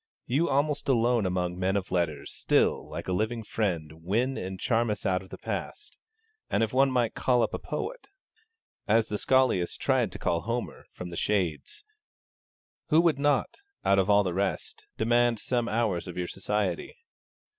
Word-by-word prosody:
You, 145 +7 +1
almost 145 +1 0
alone 120 -4 +3
among 90 -1 -2
men 95 +2 +1
of 95 -1 -4
letters, 85 -5 -1
still, - - +1
like - - -6
a 90 - 0
living 110 +4 -1
friend, 80 -8 -3
win 120 +9 0
and 95 -3 -5
charm 115 -1 +1
us 105 - -3
out 90 -1 +1
of 95 - -14
the - - -8
past; 425 - -5 0.5
and - - +2
if 110 - -2
one 135 +1 +4
might 125 -3 +1
call 125 -2 +2
up - - -1
a - - -2
poet, - - -5 0.8
as 110 +1 +3
the 105 - -2
scholiast 130 -10 +2
tried 130 -7 +1
to - - -6
call 85 -1 0
Homer, 115 +4 -4
from 90 -1 -8
the 85 - -6
shades, 95 - -1 1.0
who 160 0 +4
would 165 -4 +3
not, 145 -2 +1 0.3
out 100 0 +4
of 95 +1 +1
all 105 0 +5
the 90 -2 -2
rest, 100 +3 -3
demand 120 +1 +3
some 120 +2 -1
hours 105 -6 0
of 90 - -7
your 90 -1 -2
society? 95 -2 -2
110 Hz, 175 wpm, -28 LUFS, 90-125 Hz, 1.0 s, all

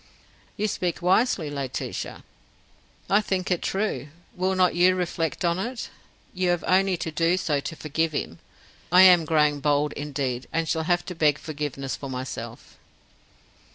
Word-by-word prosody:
"You 215 - 0
speak 180 -4 -2
wisely, 180 - +2
Laetitia." 140 -3 -5 0.8
"I 205 +2 +4
think 190 -2 -2
it 180 - +1
true. 190 - -2 0.3
Will 185 +1 0
not 185 -1 +3
you 180 +2 +4
reflect 175 -1 -2
on 170 +1 +1
it? 240 +4 -4 0.4
You 185 -1 0
have 175 -3 +1
only 190 0 +3
to 165 -1 -4
do 165 +3 +2
so 150 -6 0
to 165 - -6
forgive 160 +1 -1
him. 85 - -4 0.5
I 180 +1 +8
am 180 -3 +7
growing 150 -2 +2
bold 145 0 +1
indeed, 135 -4 -3
and 165 0 -1
shall 160 0 -1
have 175 0 +2
to 180 - -5
beg 155 -3 +2
forgiveness 145 -3 -4
for 140 - -7
myself." 125 -3 -7
165 Hz, 155 wpm, -25 LUFS, 145-185 Hz, 0.8 s, I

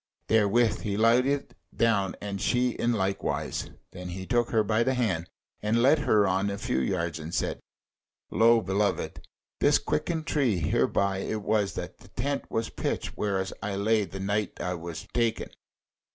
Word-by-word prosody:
Therewith 110 +1 +3
he 100 -1 -2
lighted 125 +5 +3 0.2
down 105 -5 +2
and 100 -1 -5
she 125 0 +2
in 120 +1 0
likewise: 95 -2 -2 0.2
then 90 0 -7
he 95 +1 -6
took 120 0 +1
her 110 -2 +3
by 110 +2 +1
the 130 +2 +2
hand 95 -9 -1 0.3
and 110 +3 +2
led 145 +4 +5
her 105 -8 +3
on 95 +2 +1
a 100 - -3
few 125 +5 -1
yards, 85 -4 -1
and 80 +1 -7
said: - - -1 0.7
"Lo, 115 +1 +5
beloved, 100 +2 -1 0.4
this - - +5
quicken 160 - -2
tree; 140 - +1
hereby 95 +4 +1
it 105 +2 -3
was 105 -2 +1
that - - -6
the - - -16
tent 140 +3 -3
was 115 0 -2
pitched - - -3
wherein 95 -2 0 0.2
I 100 -1 -3
lay 105 +2 +2
the 95 - -8
night 100 +1 -1
when - - -3
I - - -1
was 85 -2 -6
taken." 115 -2 0
105 Hz, 170 wpm, -28 LUFS, 95-115 Hz, 0.7 s, led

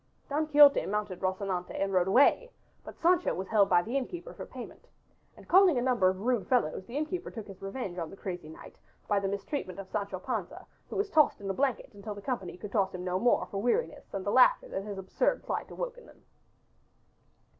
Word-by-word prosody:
Don 300 +2 0
Quixote 290 -2 +7
mounted 205 -3 -2
Rocinante 185 -1 -2
and 195 0 -1
rode 180 -1 +3
away, 285 - +4 0.3
but - - -11
Sancho 355 +1 +2
was 190 +1 -4
held 210 -3 +4
by 175 -1 +4
the 235 +7 -5
innkeeper 345 - -4
for - - -8
payment. - - -10 0.5
And - - -15
calling 370 -5 +6
a - - +1
number 245 -8 +3
of 190 +1 -4
rude 245 -1 0
fellows 190 -7 0
the 245 +4 -5
innkeeper 310 +4 -3
took 225 -4 -8
his 195 -2 -12
revenge 195 -3 -5
upon 165 -2 -4
the 195 - -12
crazy 180 -5 -6
knight 160 - -13 0.3
by 205 -1 +2
the 195 - -2
mistreatment 200 - -4
of 195 -1 -7
Sancho 200 -2 -3
Panza 210 -1 -5 0.2
who - - -6
was 405 0 -1
tossed 305 -3 +4
in 195 -1 -3
a - - -3
blanket 265 +1 -1
until 205 +1 -7
the 205 - -9
company 215 -10 -4
could 200 +2 -8
toss 195 -3 +1
him 180 - -6
no 180 0 -1
more 240 +4 +3
for 195 - -5
weariness 245 - -1
and 195 -1 -4
the 205 - 0
laughter 255 - +5
that 195 - -4
his 205 -1 -6
absurd 190 - 0
plight - - -3
awoke - - -5
in 480 - -17
them. - - -19
205 Hz, 220 wpm, -30 LUFS, 190-275 Hz, 0.5 s, Quixote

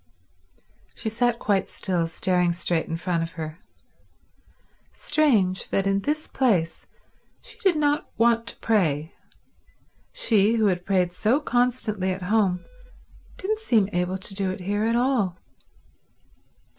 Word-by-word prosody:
She 220 - -3
sat 235 +1 0
quite 200 -4 0
still, 175 -4 -1
staring 180 +1 +1
straight 170 -1 -1
in 165 - -3
front 170 -1 -1
of 165 0 -5
her. 160 0 -7 1.3
Strange 230 -12 +1
that 195 - 0
in 195 0 +2
this 300 +8 -2
place 195 -11 0 0.5
she - - -12
did 380 -4 +3
not 295 -1 0
want 230 0 +2
to - - -4
pray. 160 -8 0 1.0
She 225 - +3
who 220 -2 +2
had 180 -2 0
prayed 180 -3 +1
so 220 +9 +2
constantly 245 -8 0
at 185 0 -5
home 190 -2 +1 0.7
didn't 430 +3 -2
seem 225 - +2
able 180 +1 -1
to 190 +1 -5
do 195 -1 -1
it 185 0 -5
here 205 +3 -1
at 230 +1 +1
all. 240 -8 +1
200 Hz, 135 wpm, -24 LUFS, 180-235 Hz, 1.3 s, did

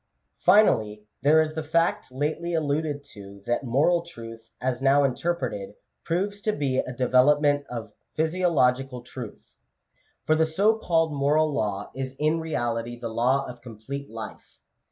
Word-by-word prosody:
Finally, 110 - +4 0.2
there 150 +4 +5
is 155 0 +1
the 160 - -3
fact 165 -2 0
lately 155 +6 -2
alluded 150 -1 -1
to, 100 -6 -13
that 120 +3 0
moral 145 +8 +2
truth, 115 -8 -11
as 130 0 -2
now 140 +1 +4
interpreted, 135 - -2 0.3
proves 200 +4 -2
to 215 - +1
be 140 -8 0
a - - -2
development 145 +3 +3
of 110 -4 -6 0.2
physiological 140 -7 +1
truth; 120 -2 -10 0.7
for 155 - +3
the 160 +1 +3
so 195 +8 +2
called 165 -7 +1
moral 150 +2 +2
law 105 -4 -2
is 130 0 -5
in 155 +3 +1
reality 120 -6 -2
the 115 - -4
law 125 +5 +1
of 120 -1 -9
com 115 -3 -11
plete 140 +6 -6
life. 110 -1 -9
140 Hz, 150 wpm, -26 LUFS, 120-160 Hz, 0.7 s, there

